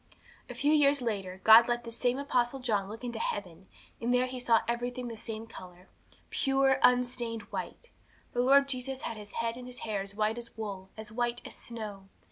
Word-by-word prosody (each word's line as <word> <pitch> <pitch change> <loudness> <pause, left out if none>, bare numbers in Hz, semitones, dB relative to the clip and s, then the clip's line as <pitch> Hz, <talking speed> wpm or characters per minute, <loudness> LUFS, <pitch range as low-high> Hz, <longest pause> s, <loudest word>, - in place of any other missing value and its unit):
'A - - -7
few 295 +2 +2
years 285 -1 +5
later, 195 -6 -3
God 225 +1 +9
let 240 0 0
this 230 -1 -5
same 245 +1 +1
Apostle 265 -2 0
John 210 -6 0
look 225 +3 -8
into 235 -2 -4
heaven; 185 -4 -4 0.3
and 235 +1 0
there 250 0 +3
he 255 0 -5
saw 235 -2 +4
everything 245 +1 -2
the 230 - -6
same 220 0 -6
colour 180 -4 -12 0.4
pure, 270 0 +2
unstained 245 -2 +2
white. 485 - -6 0.4
The 245 - +1
Lord 275 +2 +5
Jesus 265 0 -2
had 230 - -3
His 210 -1 -10
head 230 0 -2
and 250 0 -8
His 250 0 -7
hair 210 -3 -2
as 200 +1 -7
white 215 +2 0
as 235 -1 -9
wool, 195 -3 -6
as 215 -1 -8
white 240 +1 -1
as - - -7
snow. 210 -4 -7
235 Hz, 200 wpm, -30 LUFS, 215-250 Hz, 0.4 s, God